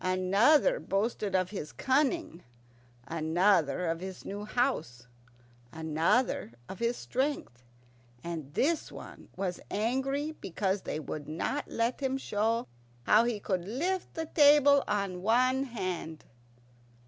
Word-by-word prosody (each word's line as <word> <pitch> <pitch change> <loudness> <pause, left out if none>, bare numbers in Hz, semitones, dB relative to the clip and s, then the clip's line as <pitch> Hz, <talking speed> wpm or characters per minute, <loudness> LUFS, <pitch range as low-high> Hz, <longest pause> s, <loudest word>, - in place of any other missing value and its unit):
Another 200 - +3
boasted 200 0 -1
of 185 0 +1
his 150 -8 -5
cunning, 275 - 0 0.7
another 165 +1 +2
of 165 0 -1
his 190 +1 -8
new 205 +1 -5
house, 215 - -1 0.7
another 160 - 0
of 190 - -8
his 235 +1 0
strength, 260 - -2 0.6
and 160 -5 -5
this 320 +4 +1
one - - -11
was 185 -2 -3
angry 265 +7 -1
because 195 - -2
they 155 - -4
would 150 0 -6
not 170 - -2
let 230 +2 -1
him 265 -1 -1
show 225 -2 -1 0.4
how 215 - +5
he 235 -3 -1
could 185 -3 -2
lift 345 - -2
the 325 - -2
table 290 -2 +6
on 195 -3 -1
one 255 +6 +2
hand. 185 - -5
210 Hz, 125 wpm, -30 LUFS, 180-265 Hz, 0.7 s, table